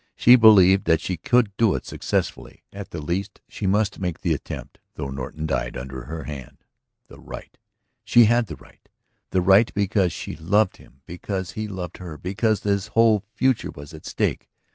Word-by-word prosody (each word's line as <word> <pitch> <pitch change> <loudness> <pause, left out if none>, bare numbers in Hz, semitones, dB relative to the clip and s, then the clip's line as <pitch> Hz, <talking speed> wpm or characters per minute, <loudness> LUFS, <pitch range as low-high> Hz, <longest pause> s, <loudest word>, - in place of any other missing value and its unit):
She 120 - +7
believed 100 -5 +6
that 80 -1 +3
she 90 - -3
could 110 +4 +1
do 115 -4 +3
it - - -5
successfully; - - -3
at 100 0 -8
the 85 - -6
least 90 +6 -4
she 100 - -4
must 105 +1 +1
make 90 -3 -3
the 85 - +1
attempt, 70 - -7 0.2
though 70 -3 -5
Norton 70 +4 -5
died - - -2
under 65 0 -7
her 80 +2 -6
hand. 70 -4 -9 0.4
The - - -15
right? - - -10 0.5
She 120 -1 +6
had 120 +1 +2
the 80 - -7
right! 65 - -21 0.4
The 95 - +1
right 95 +5 +5
because 100 -3 +1
she - - -6
loved 95 +6 +1
him, 65 - -20
because 95 +1 -5
he 110 +4 -5
loved 90 -4 -6
her, 85 -4 -8
because 105 +5 -1
his 100 -1 0
whole 110 -3 +4
future 130 -2 +1
was 70 +3 -11
at 80 - -11
stake. - - -2
95 Hz, 185 wpm, -23 LUFS, 80-105 Hz, 0.5 s, She